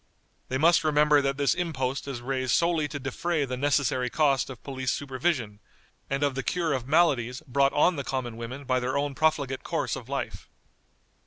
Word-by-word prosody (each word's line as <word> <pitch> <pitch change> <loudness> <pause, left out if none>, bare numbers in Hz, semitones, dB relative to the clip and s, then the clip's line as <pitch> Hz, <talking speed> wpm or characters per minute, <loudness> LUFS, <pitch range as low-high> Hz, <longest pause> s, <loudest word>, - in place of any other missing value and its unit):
They 130 - 0
must 165 +3 +4
remember 150 -1 +4
that 135 0 -1
this 140 -4 +2
impost 140 -7 -2
is 130 -4 -5
raised 130 -1 -1
solely 170 -3 +2
to 145 0 -5
defray 145 +4 -1
the 130 -1 -4
necessary 130 -2 +1
cost 140 -2 +2
of 130 -4 -10
police 130 -2 -2
supervision, 130 -6 -2 0.5
and 140 +1 -1
of 140 -1 +2
the 135 - -2
cure 165 +2 0
of 130 -2 -3
maladies 135 -6 +2
brought 140 +1 +3
on 170 +3 +3
the 140 - -2
common 130 -3 -3
women 120 +4 -7
by 130 -1 +1
their 130 +2 -1
own 145 0 -1
profligate 140 -2 0
course - - -2
of - - -9
life." - - -4
135 Hz, 185 wpm, -27 LUFS, 130-150 Hz, 0.5 s, must